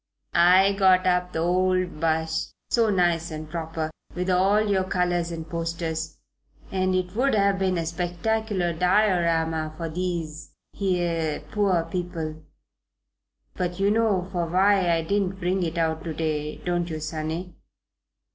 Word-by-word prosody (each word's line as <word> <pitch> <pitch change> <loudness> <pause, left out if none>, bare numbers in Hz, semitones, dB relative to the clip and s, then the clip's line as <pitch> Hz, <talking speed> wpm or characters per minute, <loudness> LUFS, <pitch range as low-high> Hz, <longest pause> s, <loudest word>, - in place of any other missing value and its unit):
"I 185 +3 +6
got 190 -1 +4
up 180 0 +1
the 160 - -2
old 185 -1 +1
'bus 160 0 -1 0.2
so 230 -2 +3
nice 175 -4 +1
and 155 -1 -6
proper, 160 -1 -4 0.2
with 180 +1 -1
all 190 +3 +4
your 200 -3 +1
colours 175 -2 0
and 165 -1 -6
posters, 165 -1 -3 0.5
and 185 -1 +1
it 185 +1 -2
would 265 +2 +2
have 200 -1 +2
been 190 -2 +1
a 165 - -1
spectacular 180 +2 -1
Diorama 165 -4 +1
for 165 -1 -4
these 165 -3 -4 0.3
'ere 170 -5 0
poor 195 -5 +2
people; 165 -2 -4 1.1
but 180 0 -3
you 200 +1 +3
know 210 -5 +1
for 175 -2 -1
why 190 +1 +3
I 165 -1 +2
didn't 195 +1 -1
bring 185 +2 0
it 170 -1 -2
out 160 -1 0
to 160 -2 -4
day, 150 -1 -2
don't 175 -1 0
you, 155 -1 -4
sonny?" 160 +3 -4
175 Hz, 145 wpm, -25 LUFS, 165-185 Hz, 1.1 s, I